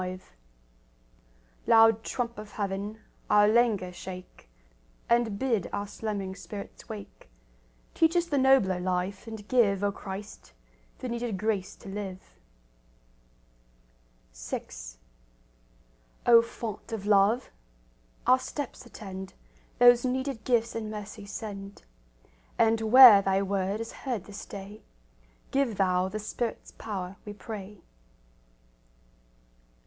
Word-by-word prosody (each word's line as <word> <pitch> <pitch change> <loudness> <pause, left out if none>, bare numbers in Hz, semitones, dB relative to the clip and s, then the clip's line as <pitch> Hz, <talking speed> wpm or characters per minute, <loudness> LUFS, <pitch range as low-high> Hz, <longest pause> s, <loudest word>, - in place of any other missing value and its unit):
V 185 0 -5 1.5
Loud 225 -1 +6
trump 235 -2 -3
of 210 -1 -10
Heaven, 205 +2 -4 0.3
our 210 0 +6
languor 215 -5 +2
shake, 180 - -10 0.6
And 235 -3 +2
bid 230 -7 0
our 200 0 -2
slumbering 200 -2 -4
spirits 200 +4 -9
wake; 205 - -10 0.6
Teach 325 +1 +3
us 345 -1 +3
the 290 -5 0
nobler 260 -9 +4
life, 185 +3 -2
and 220 -2 -8
give, 205 -6 +3
O 200 - +2
Christ, 195 +1 -9 0.4
the 255 - -5
needed 235 -3 -3
grace 200 -1 -2
to - - -15
live. 195 -1 -7 2.0
VI - - -5 1.6
O 235 -1 +8
Font 230 -2 -7
of 215 -3 -4
love! 210 +4 +3 0.7
Our 255 +1 +5
steps 280 -1 -6
attend; 190 -4 -8 0.4
Those 245 0 +7
needed 260 -2 -2
gifts 235 -2 +1
in 220 -1 -3
mercy 210 -1 -8
send; 200 -2 -7 0.7
And 225 0 +3
where 250 -6 +11
Thy 195 0 +1
word 195 +1 -1
is 230 0 -5
heard 245 -8 -4
this 205 0 -9
day, 200 +2 -9 0.7
Give 270 -6 +1
Thou 185 -1 +2
the 215 - -4
Spirit's 220 +2 -4
power, 195 -3 -6
we 210 - -7
pray. 205 -1 -9
210 Hz, 115 wpm, -28 LUFS, 195-230 Hz, 2.0 s, where